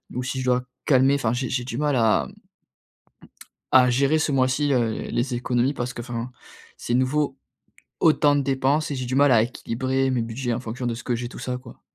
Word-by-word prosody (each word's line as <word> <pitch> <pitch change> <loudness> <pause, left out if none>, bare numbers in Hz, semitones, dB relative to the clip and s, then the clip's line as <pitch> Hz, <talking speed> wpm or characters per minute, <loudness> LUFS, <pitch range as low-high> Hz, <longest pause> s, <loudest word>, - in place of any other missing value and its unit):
Ou 125 - -1
si 130 +1 -3
je - - -4
dois 125 0 +1 0.2
calmer. 135 0 +4
Enfin 120 -5 0
j'ai 125 +1 -2
j'ai 125 -1 -1
du 120 -1 -5
mal 150 -1 +1
à 110 -2 +2 1.5
à 125 -1 +6
gérer 140 +5 +2
ce 155 -2 0
mois-ci, 135 +2 +1
heu, 120 -3 +2 0.2
les 125 +1 -1
économies 125 +3 0
parce 125 -1 -3
que, - - -6
enfin, 120 0 -5 0.4
c'est 120 - -3
nouveau, 135 +2 0 0.6
autant 150 -3 +4
de - - +2
dépenses 135 +3 0
et 145 - -3
j'ai 130 -1 -4
du 125 +1 -2
mal 140 -1 +5
à 110 - +5
équilibrer 130 +2 -2
mes 125 -2 0
budgets 120 +2 -3
en 120 - -3
fonction 125 +1 -5
de 120 - -1
ce 115 - -9
que 125 - -1
j'ai, 120 +1 -4
tout - - -10
ça 125 -1 -3
quoi. 125 -2 -14
130 Hz, 215 wpm, -24 LUFS, 120-135 Hz, 1.5 s, à